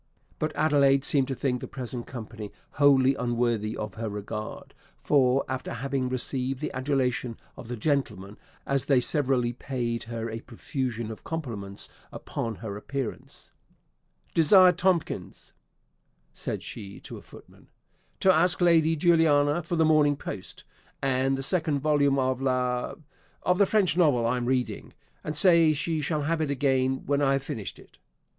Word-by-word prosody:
But 155 -1 -2
Adelaide 140 -3 +3
seemed 135 -3 +3
to 135 - -3
think 125 -1 -1
the - - -6
present 125 -2 -6
company 110 -3 -8 0.2
wholly 135 -2 +4
unworthy 120 -3 -1
of 105 -2 -5
her 110 +1 -4
regard; 105 +1 -6 0.3
for, 135 -2 +3
after 130 0 -4
having 135 +1 -2
received 130 +1 -2
the - - -4
adulation 130 -3 -1 0.2
of - - -10
the 120 0 -5
gentlemen, 105 -7 -2 0.3
as 140 -1 0
they 140 -3 +4
severally 125 -2 0
paid 120 -2 -3
her 115 0 -4
a 115 0 -5
profusion 120 -1 -4
of 110 - -10
compliments 115 -12 -5 0.2
upon 115 -1 -5
her 105 -3 -6
appearance, 135 +2 -6 0.8
"Desire 180 +3 +7
Tomkins," 180 -1 -2 0.8
said - - -5
she 100 -1 -8
to - - -9
a - - -11
footman, - - -17 0.5
"to 190 - +5
ask 175 +3 +3
Lady 165 -2 +4
Juliana 160 -2 +3
for 170 +2 -3
the 160 -1 +3
'Morning 150 -2 +4
Post,' - - -8 0.4
and 135 0 +1
the 135 - -4
second 155 -1 +1
volume 145 -1 +2
of 130 -1 0
'Le 125 -2 -1 0.2
,' - - -34
of 180 +1 +2
the 200 - +5
French 200 -5 +2
novel 145 -10 +3
I 120 +2 +1
am 120 -1 -3
reading; 130 -1 -2 0.3
and 150 0 -4
say 165 -2 +6
she 155 +1 -1
shall 150 +1 -1
have 160 +2 0
it 155 - -1
again 135 -2 0
when 140 +1 +1
I 135 -1 +3
have 135 0 -1
finished 110 -6 -5
it." - - -19
135 Hz, 160 wpm, -27 LUFS, 120-150 Hz, 0.8 s, Desire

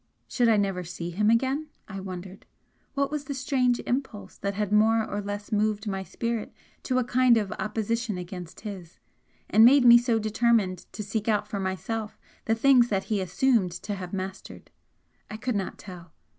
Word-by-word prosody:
Should 240 -2 +2
I 220 - +4
never 195 -3 0
see 175 0 -6
him 210 +5 +1
again, 265 +6 +1 0.2
I 195 -1 -6
wondered? 185 0 -8 0.5
What 280 0 0
was 300 -1 -3
the 280 - -4
strange 255 -2 +1
impulse 245 -5 -4
that 200 0 -3
had 210 -1 -2
more 220 +1 +4
or 205 - -3
less 205 0 -6
moved 210 0 0
my 195 -2 -2
spirit 225 +5 -4 0.4
to 255 - +2
a 255 - +2
kind 245 0 +4
of 205 -3 -1
opposition 220 0 -2
against 180 -1 -8
his, 190 -6 -8 0.5
and 220 - +5
made 260 +2 +7
me 240 0 +9
so 240 -1 +1
determined 215 -4 +1
to 210 - -5
seek 210 +2 -3
out 210 -1 +1
for 205 - -4
myself 195 +4 -4 0.3
the 225 - +2
things 250 0 +5
that 195 -2 0
he 200 - +1
assumed 195 +1 +1
to 190 +4 -5
have 185 -3 -6
mastered? 190 0 -7 0.6
I 215 - -6
could 245 +1 -2
not 195 -2 -3
tell. 180 -4 -11
210 Hz, 185 wpm, -26 LUFS, 190-235 Hz, 0.6 s, me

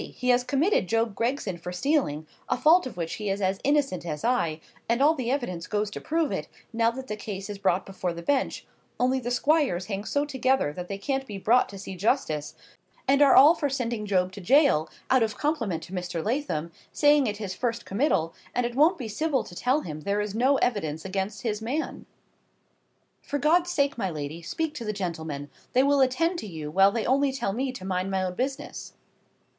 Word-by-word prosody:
he 250 - -2
has 245 0 +4
committed 285 - +1
Job 225 0 +1
Gregson 230 -5 -2
for 180 +1 -6
stealing—a 180 - -1
fault 325 -1 +5
of 245 - -10
which 165 -1 -3
he 210 - -2
is 195 +1 -1
as 190 0 0
innocent 280 - +1
as 155 -3 -5
I—and 235 +1 -1
all 295 +3 +5
the 255 -6 -3
evidence 210 -11 -2
goes 210 -1 -1
to - - -6
prove 320 -1 0
it, - - -3 0.3
now 230 0 +3
that 260 +3 -6
the 215 - -4
case 205 -1 -6
is 200 - -7
brought 190 -1 +1
before 185 -2 -3
the 170 0 -7
Bench; 275 +7 0 0.3
only 255 +1 +2
the 245 -1 -4
Squires 255 - +2
hang 200 -1 -4
so 285 +6 0
together 265 - +1
that 180 +3 -6
they 200 - -4
can't 270 +5 -2
be 205 - -6
brought 235 +6 +3
to 200 - -9
see 195 0 -7
justice, 175 - 0 0.5
and 275 +2 +4
are 280 -2 +7
all 295 +5 +9
for 295 -4 -1
sending 235 -5 -2
Job 185 -2 +1
to 200 - -9
gaol, 250 - +4 0.2
out 260 -1 +5
of 220 -2 0
compliment 230 - -1
to 175 - -11
Mr. 175 -3 -3
Lathom, 215 - -1 0.2
saying 290 -2 +4
it 205 -1 -2
his 205 -3 -4
first 235 +2 -2
committal, 195 - +1 0.2
and 245 - +1
it 240 - -3
won't 310 +8 +4
be 250 -6 -5
civil 280 +5 0
to - - -12
tell 255 +11 +1
him 155 -3 -6
there 200 +6 -1
is 210 -1 -2
no 255 +5 +3
evidence 160 - -1
against 195 +2 -3
his 215 -2 -2
man. 270 +8 -3 1.1
For 285 - -3
God's 335 +5 +3
sake, 280 -7 0
my 195 - 0
lady, 155 0 -5
speak 320 - -3
to 260 - -6
the 215 -1 -2
gentlemen; 160 -7 -4 0.2
they 255 - +5
will 280 0 +3
attend 330 +7 +2
to 215 - -6
you, 155 -5 -6
while 195 +4 +5
they 225 +1 -2
only 275 +2 +2
tell 260 -7 -2
me 260 +4 -1
to 190 -7 -8
mind 185 0 -1
my 190 -1 0
own 180 -1 -2
business." 270 +7 -4
225 Hz, 210 wpm, -26 LUFS, 185-275 Hz, 1.1 s, all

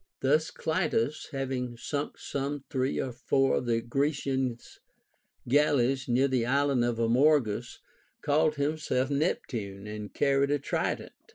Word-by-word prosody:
t - - -2
Thus 155 +3 +3
Clitus, 155 -4 -1
having 130 -3 -3
sunk' 145 +4 -4
some 140 0 -4
three 130 -1 0
or 130 - -2
four 135 +2 +1
of 125 - -3
the 115 -1 +1
Grecians 135 -1 -2 0.7
galleys 135 -1 +2
near 130 +3 +3
the 130 -3 +1
island 135 0 +2
Amorgus, 120 0 +2 0.5
called 150 +1 +2
himself 145 -2 -1
Neptune 115 - -2
and 105 -1 -6
carried 140 0 +2
a 145 - +2
trident. 140 - -2
135 Hz, 125 wpm, -29 LUFS, 120-145 Hz, 0.7 s, Thus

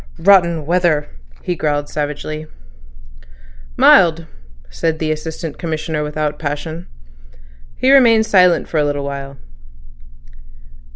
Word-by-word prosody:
"Rotten 170 -4 +3
weather," 170 -3 0 0.3
he 180 - -2
growled 145 -2 -2
savagely. 155 +1 -5 1.3
"Mild," 170 -3 +5 0.4
said 160 - -2
the 155 -1 -2
Assistant 155 0 -6
Commissioner 160 -2 -3
without 150 0 -3
passion. 155 +3 -5 0.9
He 260 - +2
remained 230 -5 +5
silent 180 -5 +3
for 160 - -1
a - - +2
little 145 -1 -2
while. 140 -1 -7
155 Hz, 105 wpm, -17 LUFS, 150-170 Hz, 1.3 s, Mild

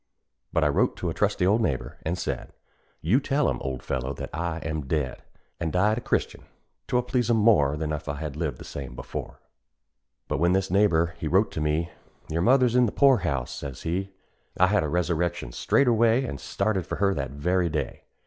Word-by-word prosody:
But - - +2
I - - +4
wrote - - +2
to - - -2
a - - -4
trusty 90 - +1
old 105 +5 +3
neighbor, 70 -12 -2
an' 80 +2 -2
said, - - -4 0.5
"You 100 - +3
tell 145 +1 +1
'em, - - -3
old 65 -2 -4
fellow, 65 +1 -2
that - - -7
I 85 +1 -2
am 80 -3 -3
dead, 75 -4 -1 0.4
An' 85 - -1
died 105 +7 +2
a - - -9
Christian; - - -2 0.4
'twill 125 0 +1
please 125 -1 0
'em 115 - +4
more, 90 -11 +4
Than 80 0 -2
if 75 0 -5
I 70 - -2
had 75 -1 -5
lived 75 -1 -2
the - - -10
same 65 -3 -7
as - - -13
before." - - -7 0.9
But - - -1
when 85 +2 +3
this 95 -1 0
neighbor 85 -4 +3
he 80 - -3
wrote 95 +7 +3
to 80 - -4
me, 75 +2 0 0.4
"Your 85 +1 0
mother's 125 +3 +4
in 125 -1 +5
the - - -2
poor 140 -2 +5
house," 70 - -2
says 70 -3 -7
he, 95 +4 -2 0.5
I 90 - +7
had 105 -3 +3
a 75 - -2
resurrection 85 -4 -1
straightway, 120 - +3
An' 70 - -5
started 100 -2 -1
for - - -3
her 100 -1 +2
that 70 -5 -3
very 85 +6 0
day. 75 -1 -4
85 Hz, 210 wpm, -26 LUFS, 75-105 Hz, 0.9 s, I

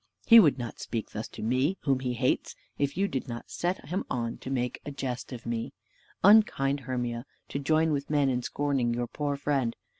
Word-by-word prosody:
He 230 0 +10
would 155 -11 +5
not 120 -2 -6
speak 115 -2 -4
thus 110 +1 -5
to - - -9
me, 130 - +1
whom 135 -3 +1
he 125 -1 -2
hates, 125 +2 0 0.2
if 140 +1 0
you 200 +1 +2
did 135 -8 -3
not 120 -1 -7
set 175 -4 -2
him 185 +3 -1
on 115 -2 -2
to - - -7
make 125 -2 -2
a - - -6
jest 135 -3 -4
of 120 -3 -8
me. 115 -1 -3 0.5
Unkind 185 -9 +5
Hermia, 120 -2 -3 0.3
to 140 - -3
join 155 +3 +2
with 140 -1 -2
men 145 -2 +3
in 125 -2 +1
scorning 135 -3 0
your 120 0 -1
poor 145 +4 -2
friend. 140 -4 0
135 Hz, 205 wpm, -28 LUFS, 120-145 Hz, 0.5 s, He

